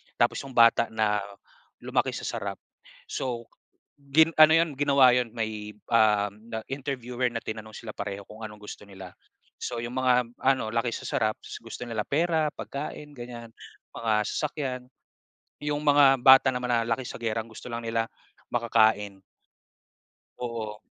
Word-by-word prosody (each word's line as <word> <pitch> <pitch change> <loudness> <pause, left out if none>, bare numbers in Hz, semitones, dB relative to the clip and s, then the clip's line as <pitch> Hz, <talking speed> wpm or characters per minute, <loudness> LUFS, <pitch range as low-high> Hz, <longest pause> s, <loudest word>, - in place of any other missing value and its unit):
tapos - - +2
'yong 135 -2 -10
bata 115 0 +6
na 110 -2 +1 0.6
lumaki - - 0
sa - - -6
sarap. - - -3 0.5
So 120 -3 -4 0.5
gin 155 +4 +3
ano 155 0 +8
'yon 165 -2 +3
ginawa 140 -3 +5
'yon 125 -2 0
may, 110 -2 -4 0.2
ah, 105 -3 +4
na 110 +2 -7
interviewer 130 -3 -3
na 115 - -3
tinanong 110 0 -6
sila 110 -2 -8
pareho 100 -1 -5
kung 110 +1 -11
anong 105 -1 -8
gusto 105 - -9
nila. 95 -2 -11 0.4
So 120 - -4
'yong 120 +2 -5
mga, 130 -1 +3 0.3
ano, 130 -4 +2
laki 115 +1 +1
sa - - -5
sarap, 110 0 0
s - - -8
gusto 120 +1 -7
nila 110 -2 -2
pera, 160 +3 +1
pagkain, 145 +1 -7
ganiyan, 120 -2 -9 0.4
mga 115 -1 0
sasakyan. 140 -4 -3 0.8
'Yong 150 0 -1
mga 145 -2 +6
bata 130 0 +8
naman 125 0 -3
na 115 -1 +2
laki 120 +3 -1
sa - - -7
giyera, 115 -1 -1
ang 115 - -17
gusto 110 - -10
lang 115 - -3
nila 115 0 0 0.4
makakain. 110 -4 +2 1.2
Oo. 115 -3 -5
120 Hz, 155 wpm, -27 LUFS, 110-135 Hz, 1.2 s, ano